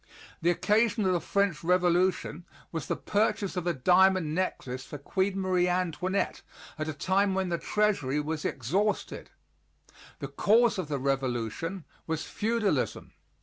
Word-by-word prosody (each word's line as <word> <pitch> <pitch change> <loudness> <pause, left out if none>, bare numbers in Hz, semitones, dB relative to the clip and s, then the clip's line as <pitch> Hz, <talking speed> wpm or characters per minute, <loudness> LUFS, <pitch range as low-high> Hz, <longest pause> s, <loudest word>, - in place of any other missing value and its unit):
The 170 - +3
occasion 215 +4 +2
of 185 - +3
the 175 - +1
French 200 -6 0
Revolution 180 -1 +1 0.3
was 160 -5 -4
the - - 0
purchase 210 -1 0
of 180 -1 -2
a 175 - +2
diamond 180 +2 +4
necklace 135 -7 -2
for 145 - -8
Queen 190 +7 -1
Marie 185 -2 +2
Antoinette 180 +2 -1 0.4
at 155 - -2
a 155 - -2
time 190 +5 +1
when 190 -1 0
the 170 -1 -1
treasury 190 -10 +1
was 150 +1 -3
exhausted; 185 - -1 0.9
the - - -5
cause 225 0 +3
of 180 - -3
the 145 -1 -2
revolution 135 - -2 0.2
was 160 -1 -2
feudalism. 210 - -1
180 Hz, 145 wpm, -28 LUFS, 155-195 Hz, 0.9 s, diamond